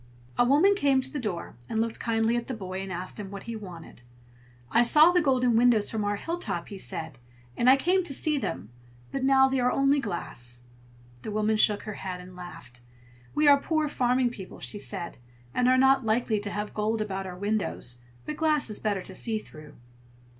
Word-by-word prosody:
A - - +4
woman 295 +11 +5
came 280 -8 +2
to 265 +1 -6
the 290 - -3
door, 200 - -4
and 220 - -1
looked 225 0 -1
kindly 225 0 +1
at 240 -1 -2
the 260 - -3
boy, 190 -2 -5
and 195 -1 -6
asked 180 +3 -5
him 200 -2 -6
what 200 0 -8
he 235 - -6
wanted. 180 - -10 0.7
"I 235 - +5
saw 305 +7 +6
the 355 0 +3
golden 255 -5 +2
windows 230 -3 +4
from 220 -2 -2
our 205 0 0
hilltop," 330 - -4
he 200 - -8
said, 120 - -5 0.4
"and 240 - +3
I 260 - +9
came 360 +7 +2
to 300 - -5
see 305 0 +1
them, 105 - -4 0.4
but 270 - -3
now 265 0 +5
they 265 0 0
are 250 0 +2
only 275 +1 +3
glass." 120 - -5 0.6
The - - -6
woman 215 +1 +1
shook 210 -1 +3
her 215 - -5
head 185 -2 -4
and 180 0 -12
laughed. 125 -9 -11 0.5
"We 300 0 +3
are 285 -1 +7
poor 310 -1 0
farming 250 -2 +1
people," 190 -5 -10
she 205 - -3
said, 190 -8 -6 0.3
"and 250 - +2
are 255 0 +5
not 265 0 +5
likely 220 0 +1
to 205 0 -3
have 210 0 -4
gold 215 +1 -1
about 195 -2 -3
our 180 -1 -7
windows; 200 - -2 0.3
but 300 - -5
glass 305 -7 +1
is 210 - -5
better 205 -3 -1
to 190 - -9
see 220 +3 -1
through." 155 -7 -11
220 Hz, 210 wpm, -27 LUFS, 195-265 Hz, 0.7 s, I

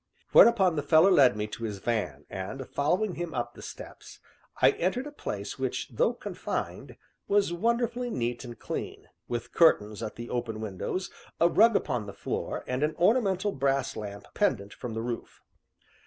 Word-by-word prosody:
Whereupon 190 -8 +6
the - - +1
fellow 160 +6 +5
led 130 - +6
me 105 - -1
to 105 +2 -8
his 105 -3 -3
van, 95 - -2
and, 100 +7 -6
following 180 +8 0
him 175 -1 -5
up 120 -1 -2
the - - -12
steps, - - -10 0.4
I - - +6
entered 215 +10 -1
a 295 - -7
place 290 - -5
which, - - -2
though - - +1
confined, - - -5 0.3
was 200 -3 +2
wonderfully 235 +5 0
neat 120 - -2
and 120 -2 -9
clean, - - -6 0.2
with 120 -1 -4
curtains 105 -10 +4
at 110 -2 -5
the 120 0 -7
open 120 -3 -3
windows, 110 - -4 0.3
a 170 - +6
rug 225 +4 +5
upon 120 -7 0
the 100 - -7
floor, - - -4
and 125 +1 -2
an 155 +1 +1
ornamental 200 0 +2
brass 135 -2 0
lamp 100 -1 -7
pendent 110 - 0
from 120 -3 -6
the 115 - -2
roof. 120 -1 -6
135 Hz, 170 wpm, -28 LUFS, 115-190 Hz, 0.4 s, Whereupon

